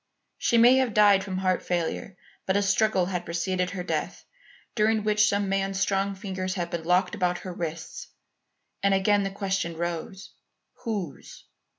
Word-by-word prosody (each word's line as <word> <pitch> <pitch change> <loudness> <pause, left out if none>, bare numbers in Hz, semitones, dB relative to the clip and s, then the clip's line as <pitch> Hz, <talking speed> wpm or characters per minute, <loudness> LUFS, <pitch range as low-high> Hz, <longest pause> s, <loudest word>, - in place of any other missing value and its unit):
She 235 - +2
may 240 +3 +7
have 255 -4 +1
died 205 -2 +6
from 190 -2 -4
heart 185 -1 +1
failure, 175 +2 -3 0.3
but 190 +1 +2
a 205 - +2
struggle 200 -1 +2
had 180 -1 -3
preceded 180 +2 -1
her 185 -2 -5
death, - - -3 0.5
during 215 -1 +2
which 210 0 +3
some 200 0 0
man's 195 0 -1
strong 195 0 0
fingers 190 -1 -4
had 175 -2 -3
been 170 -2 -4
locked 180 +2 +2
about 180 -4 0
her 185 - -5
wrists. 165 -1 -6 0.7
And 200 0 +3
again 205 +1 +3
the 195 - -1
question 195 -4 -2
rose, 175 +4 -5 0.5
Whose? 195 - -5
195 Hz, 165 wpm, -26 LUFS, 180-205 Hz, 0.7 s, may